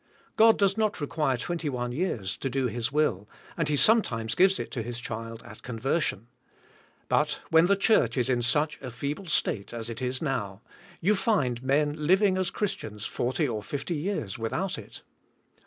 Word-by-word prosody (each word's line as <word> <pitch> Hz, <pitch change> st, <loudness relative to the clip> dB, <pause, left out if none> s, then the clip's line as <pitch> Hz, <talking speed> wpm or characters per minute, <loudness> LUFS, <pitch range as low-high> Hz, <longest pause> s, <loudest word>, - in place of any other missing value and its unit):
God 225 Hz, 0 st, +6 dB
does 200 Hz, 0 st, +2 dB
not 215 Hz, -1 st, 0 dB
require 145 Hz, -3 st, 0 dB
twenty 165 Hz, +4 st, -3 dB
one 125 Hz, -2 st, -3 dB
years 120 Hz, -, -2 dB
to 135 Hz, -, -3 dB
do 135 Hz, 0 st, 0 dB
His 120 Hz, 0 st, -2 dB
will, 120 Hz, -10 st, 0 dB, 0.3 s
and 165 Hz, -3 st, -1 dB
He 150 Hz, -, +2 dB
sometimes 125 Hz, -, +3 dB
gives 190 Hz, +6 st, +4 dB
it -, -, -5 dB
to 125 Hz, -, -3 dB
His 120 Hz, +1 st, -5 dB
child 115 Hz, 0 st, -6 dB
at -, -, -12 dB
conversion. 125 Hz, -, -1 dB, 0.8 s
But 150 Hz, 0 st, +1 dB
when 165 Hz, +1 st, +6 dB
the 200 Hz, -, +4 dB
church 200 Hz, -5 st, +3 dB
is 125 Hz, -, +1 dB
in 125 Hz, -2 st, +1 dB
such 150 Hz, +6 st, +1 dB
a 130 Hz, -, -5 dB
feeble 145 Hz, +10 st, -4 dB
state 115 Hz, -11 st, 0 dB
as 115 Hz, 0 st, -5 dB
it 115 Hz, -, -7 dB, 0.2 s
now 115 Hz, -10 st, -3 dB
is, -, -, -32 dB, 0.3 s
you 205 Hz, +5 st, +3 dB
find 140 Hz, -, +1 dB
men 145 Hz, +3 st, +1 dB
liv 190 Hz, +4 st, +5 dB
ing 195 Hz, -2 st, +4 dB
as 185 Hz, -2 st, 0 dB
Christians 110 Hz, -, -4 dB
forty 130 Hz, +5 st, -1 dB
or 110 Hz, -4 st, -3 dB
fifty 145 Hz, -, -4 dB
years 150 Hz, -, -3 dB
without 170 Hz, +12 st, -2 dB
it. -, -, -11 dB
140 Hz, 185 wpm, -27 LUFS, 120-175 Hz, 0.8 s, God